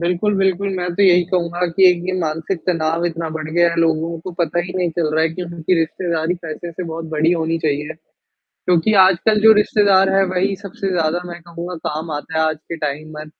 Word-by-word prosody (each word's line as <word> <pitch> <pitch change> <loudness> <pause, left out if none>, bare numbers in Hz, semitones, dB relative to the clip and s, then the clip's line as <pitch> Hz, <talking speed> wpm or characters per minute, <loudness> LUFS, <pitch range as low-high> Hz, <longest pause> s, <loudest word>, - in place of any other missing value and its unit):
बिल्कुल, 180 +4 0
बिल्कुल, 195 0 +1
मैं 180 0 -2
तो 200 - +1
यही 180 -2 +6
कहूँगा 175 -1 0
कि 190 -1 +7
एक 180 - +3
ये - - 0
मानसिक 165 +2 -2
तनाव 165 -1 0
इतना 165 -1 -3
बढ़ 155 -1 -5
गया 170 +2 +3
है 170 - -4
लोगों 165 0 0
को 185 - -7
पता 170 0 0
ही 180 - -7
नहीं 180 -2 0
चल 160 -1 -1
रहा 160 - +2
है 165 - +3
कि 180 +3 -6
उनकी 170 0 -1
रिश्तेदारी 165 0 -1
पैसे 165 +2 -6
से 170 +2 -6
बहुत 165 0 -6
बड़ी 160 +2 +2
होनी 165 -1 -1
चाहिए, 150 0 -1 0.8
क्योंकि 180 +4 +2
आजकल 195 +4 +3
जो 220 0 +8
रिश्तेदार 200 -2 +3
है 195 - +4
वही 185 +2 0
सबसे 195 0 -5
ज़्यादा 165 0 0
मैं 175 -1 -8
कहूँगा 170 +1 -7
काम 155 +1 -5
आता 160 +2 -4
हैं 160 - +3
आज 155 -1 -1
के 170 - -3
टाइम 155 +1 -4
में 155 - -7
170 Hz, 220 wpm, -19 LUFS, 160-180 Hz, 0.8 s, जो